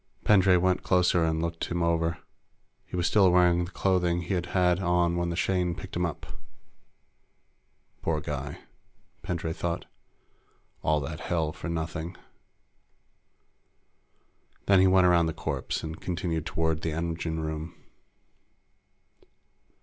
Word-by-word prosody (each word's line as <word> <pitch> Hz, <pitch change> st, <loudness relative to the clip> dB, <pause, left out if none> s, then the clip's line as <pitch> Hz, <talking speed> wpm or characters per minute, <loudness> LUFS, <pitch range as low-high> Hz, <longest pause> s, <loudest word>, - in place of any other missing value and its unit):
Pendray 95 Hz, -3 st, +5 dB
went 90 Hz, +1 st, +2 dB
closer 90 Hz, -2 st, +3 dB
and 80 Hz, 0 st, 0 dB
looked 85 Hz, 0 st, -3 dB
him 85 Hz, 0 st, -2 dB
over. 85 Hz, 0 st, +1 dB, 0.7 s
He -, -, -7 dB
was 90 Hz, -1 st, 0 dB
still 95 Hz, -2 st, +5 dB
wearing 90 Hz, -1 st, +4 dB
the -, -, -9 dB
clothing 90 Hz, -3 st, +1 dB
he'd 90 Hz, 0 st, -2 dB
had 90 Hz, -1 st, +2 dB
on 85 Hz, -2 st, +2 dB
when 85 Hz, 0 st, -1 dB
the 85 Hz, -, -2 dB
Shane 90 Hz, -1 st, 0 dB
picked -, -, -9 dB
him 90 Hz, 0 st, +1 dB
up. 85 Hz, -, -7 dB, 1.8 s
Poor 80 Hz, -2 st, 0 dB
guy, 70 Hz, -1 st, -5 dB, 0.6 s
Pendray 85 Hz, -2 st, -3 dB
thought. 85 Hz, +1 st, -3 dB, 1.0 s
All 75 Hz, -1 st, +1 dB
that 75 Hz, +2 st, -5 dB
hell 80 Hz, -3 st, -1 dB
for 85 Hz, -, -7 dB
nothing. 80 Hz, +1 st, -4 dB, 2.5 s
Then 100 Hz, -1 st, +5 dB
he 95 Hz, -, +6 dB
went 95 Hz, 0 st, +5 dB
around 85 Hz, -2 st, +4 dB
the 80 Hz, -, -2 dB
corpse -, -, -3 dB
and 80 Hz, 0 st, -6 dB
continued 85 Hz, -3 st, -2 dB
toward 80 Hz, -1 st, 0 dB
the 80 Hz, -, -2 dB
engine 80 Hz, 0 st, -3 dB
room. 80 Hz, +2 st, -5 dB
85 Hz, 130 wpm, -27 LUFS, 80-90 Hz, 2.5 s, he